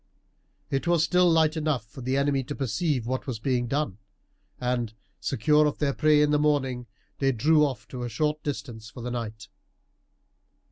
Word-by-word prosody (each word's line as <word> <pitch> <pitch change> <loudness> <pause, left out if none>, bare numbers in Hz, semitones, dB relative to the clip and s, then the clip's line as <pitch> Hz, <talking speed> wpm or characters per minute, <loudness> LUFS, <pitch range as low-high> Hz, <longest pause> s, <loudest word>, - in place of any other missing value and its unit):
It 135 +5 -1
was 170 -2 +3
still 180 +2 +4
light 160 -1 +3
enough 150 -7 -1
for 130 +4 -11
the 130 +2 0
enemy 140 -1 +1
to 145 - -5
perceive 135 - -1
what 130 +3 -3
was 125 -4 -2
being 120 +1 0
done, 135 -7 -2 0.6
and, 120 -3 -1 0.2
secure 150 +1 +3
of 145 - -2
their 140 -2 0
prey 150 0 +4
in 150 - +2
the 150 - +3
morning, 135 -5 0 0.3
they 135 -1 +3
drew 150 +6 +4
off 135 -4 -2
to 125 - -6
a 120 - -3
short 150 +6 -1
distance 120 -6 -5
for 115 +4 -10
the 125 - -3
night. 110 -3 -5
135 Hz, 180 wpm, -26 LUFS, 120-150 Hz, 0.6 s, still